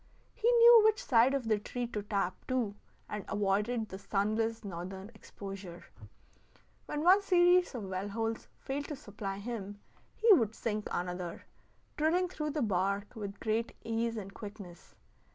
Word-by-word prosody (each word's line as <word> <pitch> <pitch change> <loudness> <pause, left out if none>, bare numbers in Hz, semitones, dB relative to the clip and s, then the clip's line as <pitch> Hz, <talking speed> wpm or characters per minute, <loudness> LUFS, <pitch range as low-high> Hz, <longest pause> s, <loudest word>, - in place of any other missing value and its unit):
He 470 - +2
knew 470 -1 +9
which 435 -1 +3
side 250 +1 +4
of 255 -4 -2
the 215 -2 +2
tree 245 +4 -4
to 225 -3 -4
tap, 200 -3 -1
too, 245 -5 0 0.3
and 210 -1 -5
avoided 210 +3 0
the 190 - -7
sunless 220 +3 -1
northern 190 +3 -6
exposure. 195 -4 -9 1.0
When 300 0 -3
one 375 +4 +6
series 360 -4 +4
of 230 - -4
well 190 +1 -4
holes 225 +2 -3
failed 285 +2 -4
to 295 - -5
supply 205 -6 -6
him, 205 -2 -6 0.4
he 445 -1 +6
would 225 - +2
sink 215 -2 -3
another, 180 -1 -4 0.5
drilling 350 +4 +2
through 305 -4 -3
the 300 -2 -1
bark 200 +1 -1
with 205 -2 -6
great 225 +1 -1
ease 230 0 -1
and 195 -2 -7
quickness. 200 -5 -10
220 Hz, 150 wpm, -32 LUFS, 200-270 Hz, 1.0 s, knew